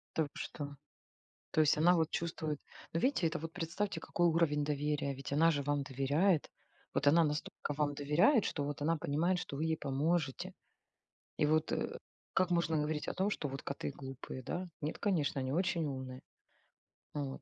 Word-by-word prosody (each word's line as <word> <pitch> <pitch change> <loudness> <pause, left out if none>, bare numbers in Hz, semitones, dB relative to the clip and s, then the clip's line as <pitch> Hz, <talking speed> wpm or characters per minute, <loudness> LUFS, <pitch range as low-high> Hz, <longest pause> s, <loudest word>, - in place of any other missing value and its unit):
Та 160 - +3
вы 145 - -3
что. 145 -1 -5 0.8
То 155 - +3
есть 150 -1 +5
она 175 +3 +6
вот 160 -2 +2
чувствует. 160 -3 -2 0.3
Ну 165 - 0
видите, 255 -10 +2
это 165 +1 0
вот 165 +1 -6
представьте 180 +4 -2
какой 175 0 +1
уровень 155 -3 +3
доверия, 145 -1 0
ведь 135 +1 -7
она 165 +3 +5
же 145 -3 0
вам 145 0 0
доверяет, 145 +6 +2 0.4
вот 145 - 0
она 165 +3 +7
настолько 150 0 -2
вам 145 -1 0
доверяет, 155 - +4
что 145 - -1
вот 145 0 -4
она 165 +2 +2
понимает, 165 +5 +1
что 140 - -5
вы 155 - -1
ей 160 0 +1
поможете. 145 +1 0 0.9
И 150 - +3
вот, 155 +1 +2
э, - - -1 0.4
как 185 -1 +3
можно 165 -2 +2
говорить 150 0 -1
о - - -1
том, 190 +2 +1
что 150 - -2
вот 135 0 -5
коты 140 0 -3
глупые, 135 -1 -7
да? 180 +6 -3
Нет, 150 +2 -2
конечно, 155 -8 +1
они 130 0 -2
очень 170 0 +1
умные. 130 -2 -5 0.9
Вот 140 -2 -3
150 Hz, 185 wpm, -34 LUFS, 145-170 Hz, 0.9 s, она